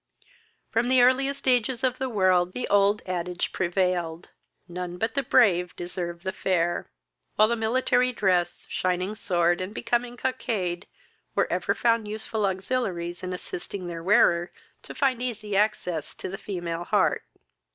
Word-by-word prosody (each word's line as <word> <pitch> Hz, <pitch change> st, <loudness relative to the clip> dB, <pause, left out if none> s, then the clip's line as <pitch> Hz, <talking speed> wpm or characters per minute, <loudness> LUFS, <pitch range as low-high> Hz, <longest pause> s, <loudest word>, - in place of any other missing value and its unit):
From 235 Hz, +2 st, +1 dB
the 255 Hz, -1 st, +6 dB
earliest 270 Hz, +2 st, +2 dB
ages 250 Hz, 0 st, +2 dB
of 255 Hz, -1 st, +1 dB
the 265 Hz, 0 st, -1 dB
world, 185 Hz, -4 st, +2 dB
the 250 Hz, -, -3 dB
old 205 Hz, +1 st, +3 dB
adage 180 Hz, -1 st, -2 dB
prevailed, 175 Hz, -2 st, -1 dB, 0.4 s
"None 180 Hz, 0 st, -5 dB
but 225 Hz, +4 st, -1 dB
the 280 Hz, -, +1 dB
brave 190 Hz, -9 st, +3 dB
deserve 175 Hz, -1 st, -5 dB
the 190 Hz, -, -1 dB
fair," 175 Hz, -3 st, 0 dB, 0.5 s
while 215 Hz, -, +6 dB
the 235 Hz, -, +1 dB
military 245 Hz, +2 st, +2 dB
dress, 180 Hz, -6 st, 0 dB
shining 185 Hz, +2 st, -1 dB
sword, 175 Hz, -4 st, +1 dB
and 190 Hz, +4 st, -5 dB
becoming 240 Hz, +1 st, -1 dB
cockade, 200 Hz, -9 st, -2 dB, 0.5 s
were -, -, +3 dB
ever -, -, 0 dB
found 230 Hz, -3 st, +2 dB
useful 215 Hz, 0 st, -2 dB
auxiliaries 185 Hz, -3 st, -2 dB
in 185 Hz, -, -4 dB
assisting 180 Hz, +1 st, -5 dB
their 170 Hz, -1 st, -5 dB
wearer 175 Hz, -2 st, +4 dB, 0.3 s
to -, -, -10 dB
find 260 Hz, -3 st, +1 dB
easy 215 Hz, -5 st, -3 dB
access 185 Hz, -6 st, 0 dB
to -, -, -6 dB
the 195 Hz, -, -5 dB
female 175 Hz, -4 st, -4 dB
heart. -, -, +2 dB
195 Hz, 150 wpm, -26 LUFS, 175-235 Hz, 0.5 s, the